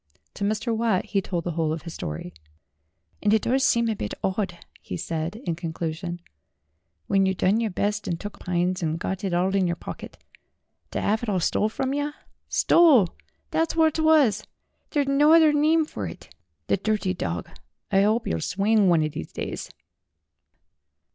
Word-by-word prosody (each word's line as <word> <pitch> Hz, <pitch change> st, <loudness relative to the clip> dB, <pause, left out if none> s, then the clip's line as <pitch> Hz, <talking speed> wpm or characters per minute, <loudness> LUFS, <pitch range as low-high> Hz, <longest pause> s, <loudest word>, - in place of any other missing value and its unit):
To -, -, -5 dB
Mr. 215 Hz, +3 st, 0 dB
Watt 220 Hz, -4 st, +1 dB
he 200 Hz, -, 0 dB
told 175 Hz, -3 st, -3 dB
the 175 Hz, -, -2 dB
whole 160 Hz, -1 st, 0 dB
of 160 Hz, 0 st, -4 dB
his 165 Hz, -1 st, -7 dB
story. 80 Hz, -, -6 dB, 0.9 s
"And 205 Hz, -, +2 dB
it 220 Hz, -, +1 dB
does 265 Hz, +2 st, +2 dB
seem 235 Hz, -4 st, +3 dB
a 220 Hz, -, 0 dB
bit 105 Hz, -, -4 dB
'awd," 190 Hz, -2 st, -1 dB, 0.2 s
he 90 Hz, -, -6 dB
said, 165 Hz, -, -3 dB
in 170 Hz, -, -1 dB
conclu 165 Hz, -1 st, -3 dB
sion; 175 Hz, +1 st, -6 dB, 0.8 s
"when 195 Hz, -1 st, +2 dB
yer 190 Hz, -, 0 dB
done 195 Hz, +5 st, +2 dB
yer 230 Hz, -2 st, 0 dB
best 205 Hz, +2 st, -2 dB
an' 170 Hz, -, -1 dB
took 205 Hz, +4 st, -8 dB
pines, 180 Hz, 0 st, -1 dB
an' 160 Hz, -2 st, 0 dB
got 190 Hz, +3 st, -4 dB
it 195 Hz, -, -1 dB
all 180 Hz, +2 st, +1 dB
in 195 Hz, -2 st, +2 dB
yer 170 Hz, -, 0 dB
pocket, -, -, -9 dB, 0.7 s
ter -, -, -3 dB
'ave 220 Hz, +1 st, 0 dB
it 185 Hz, -3 st, 0 dB
stole 210 Hz, +5 st, +1 dB
from 265 Hz, +4 st, -2 dB
yer. 290 Hz, +1 st, -2 dB, 0.3 s
Stole 285 Hz, -, +5 dB, 0.4 s
thet's 325 Hz, 0 st, 0 dB
whort 320 Hz, -1 st, +3 dB
it -, -, +2 dB
was; 300 Hz, -10 st, +4 dB, 0.5 s
theer's 290 Hz, -2 st, +1 dB
no 290 Hz, +3 st, +5 dB
other 320 Hz, -2 st, +6 dB
nime 310 Hz, +2 st, +3 dB
fur -, -, -5 dB
it. -, -, -11 dB, 0.3 s
The -, -, +1 dB
dirty 195 Hz, -2 st, 0 dB
dog, 85 Hz, -, -4 dB, 0.4 s
I 195 Hz, 0 st, +4 dB
'ope 220 Hz, +3 st, +1 dB
'e'll 80 Hz, -, -1 dB
swing 200 Hz, -, +2 dB
one 165 Hz, -3 st, +4 dB
o' -, -, +1 dB
these 145 Hz, -, -7 dB
days -, -, -5 dB
200 Hz, 185 wpm, -25 LUFS, 175-235 Hz, 0.9 s, other